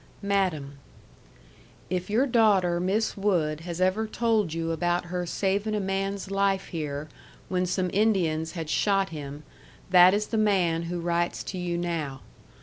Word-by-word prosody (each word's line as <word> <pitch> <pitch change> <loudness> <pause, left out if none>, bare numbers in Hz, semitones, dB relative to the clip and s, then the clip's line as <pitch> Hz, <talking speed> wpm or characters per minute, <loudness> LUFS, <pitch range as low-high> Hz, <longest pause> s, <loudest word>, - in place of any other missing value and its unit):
Madam: 175 -9 -1 1.1
If 180 +1 -2
your 230 +6 +3
daughter 205 -8 +3
Miss 195 +5 0
Wood 175 -7 0
has 170 +1 -6
ever 185 +4 +1
told 220 -5 +1
you 165 0 -2
about 175 +2 0
her 180 -1 -2
saving 200 +4 0
a - - 0
man's 195 0 -2
life 195 -1 +1
here 150 -3 -4 0.4
when 185 -1 0
some 180 0 -1
Indians 175 -7 +1
had 165 -3 -5
shot 195 +4 +1
him 145 -1 -7 0.5
that 180 +1 +8
is 210 +1 0
the 220 - +2
man 180 -6 +2
who 175 0 -3
writes 170 0 -1
to 185 - -5
you 175 -1 -2
now. 160 -6 -3
180 Hz, 150 wpm, -27 LUFS, 165-200 Hz, 1.1 s, that